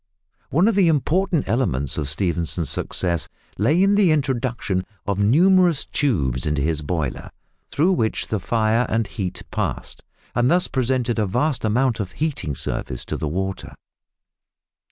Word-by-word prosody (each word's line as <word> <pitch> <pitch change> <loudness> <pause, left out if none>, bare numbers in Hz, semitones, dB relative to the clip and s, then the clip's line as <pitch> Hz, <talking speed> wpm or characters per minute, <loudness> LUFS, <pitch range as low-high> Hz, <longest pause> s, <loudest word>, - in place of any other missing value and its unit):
One 170 +8 +3
of 230 - +3
the 195 -3 +4
important 165 +2 +1
elements 85 - 0
of 75 -2 -2
Stephenson's 85 +1 -1
success 85 -3 -2 0.3
lay 150 - +3
in 200 +1 +4
the 200 -3 +4
introduction 125 -9 -1 0.2
of 100 -1 -1
numerous 170 - +4
tubes 70 - 0
into 75 -2 0
his 80 0 0
boiler, 75 -3 -3 0.4
through 165 +6 +2
which 110 -10 -1
the 110 - 0
fire, 110 +3 +1
and 115 0 +1
heat 95 -5 -5
passed, - - -3 0.3
and 120 +1 +2
thus 180 +1 +3
presented 125 -2 0
a 105 - +1
vast 130 +8 0
amount 115 +2 +1
of 95 -3 -4
heating 135 - -2
surface 60 0 -4
to - - -4
the 80 - -3
water. 95 +5 -4
115 Hz, 150 wpm, -22 LUFS, 90-145 Hz, 0.4 s, the